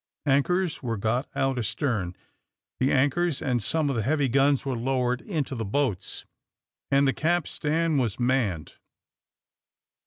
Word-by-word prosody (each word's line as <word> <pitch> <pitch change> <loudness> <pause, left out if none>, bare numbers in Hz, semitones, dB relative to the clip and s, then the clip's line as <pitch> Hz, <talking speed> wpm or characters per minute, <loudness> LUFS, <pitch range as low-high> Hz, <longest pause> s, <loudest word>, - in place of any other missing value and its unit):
Anchors 160 +6 +1
were 115 -4 -2
got 115 +6 -1
out 135 -1 0
astern, 105 - -1 0.6
the 130 - +2
anchors 145 +4 +2
and 125 -4 0
some 155 +8 +1
of 140 - 0
the 115 - 0
heavy 140 +4 +1
guns 140 +2 +2
were 135 -2 -1
lowered 125 0 0
into 155 -8 -3
the 115 -3 -3
boats, 110 -2 -2 0.6
and 140 0 +4
the 135 - +2
capstan 165 -1 0
was 120 -5 -1
manned. 120 - 0
135 Hz, 135 wpm, -26 LUFS, 120-145 Hz, 0.6 s, and